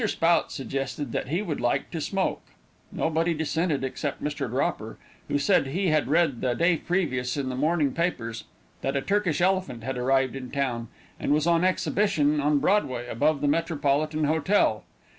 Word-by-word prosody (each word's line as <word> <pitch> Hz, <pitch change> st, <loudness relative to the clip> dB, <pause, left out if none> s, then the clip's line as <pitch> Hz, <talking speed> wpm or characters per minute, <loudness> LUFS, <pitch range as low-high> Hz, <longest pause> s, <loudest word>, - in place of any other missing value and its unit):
Spout 170 Hz, -3 st, +2 dB
suggested 135 Hz, 0 st, -4 dB
that -, -, -2 dB
he 170 Hz, +9 st, -1 dB
would 160 Hz, -7 st, -3 dB
like 120 Hz, 0 st, 0 dB
to 165 Hz, -, -4 dB
smoke. 195 Hz, +4 st, -1 dB, 0.5 s
Nobody 165 Hz, +1 st, 0 dB
dissented 160 Hz, -1 st, -1 dB
except 135 Hz, +2 st, -4 dB
Mr. 145 Hz, -3 st, -2 dB
Dropper, 115 Hz, -3 st, -2 dB, 0.3 s
who -, -, +1 dB
said 140 Hz, -1 st, +3 dB
he 185 Hz, +6 st, 0 dB
had 155 Hz, -3 st, +2 dB
read 155 Hz, -4 st, +2 dB
the 125 Hz, -2 st, 0 dB
day 170 Hz, +4 st, +3 dB
previous, 145 Hz, -8 st, -1 dB
in 135 Hz, -2 st, -2 dB
the 130 Hz, -, -3 dB
morning 150 Hz, 0 st, +1 dB
papers, 120 Hz, -10 st, -2 dB, 0.4 s
that 135 Hz, -, -1 dB
a -, -, 0 dB
Turkish 195 Hz, -6 st, 0 dB
elephant 185 Hz, -10 st, 0 dB
had 130 Hz, 0 st, -3 dB
arrived 135 Hz, +1 st, +2 dB
in 130 Hz, -2 st, -6 dB
town, 125 Hz, -5 st, -2 dB, 0.3 s
and -, -, -1 dB
was 150 Hz, +1 st, +2 dB
on 170 Hz, 0 st, +3 dB
exhibition 185 Hz, -5 st, +2 dB
on 145 Hz, +1 st, +3 dB
Broadway, 135 Hz, -9 st, +1 dB
above 145 Hz, +5 st, +1 dB
the 145 Hz, -, +1 dB
Metropolitan 155 Hz, -1 st, 0 dB
Hotel. 155 Hz, -, +2 dB
150 Hz, 170 wpm, -26 LUFS, 135-170 Hz, 0.5 s, said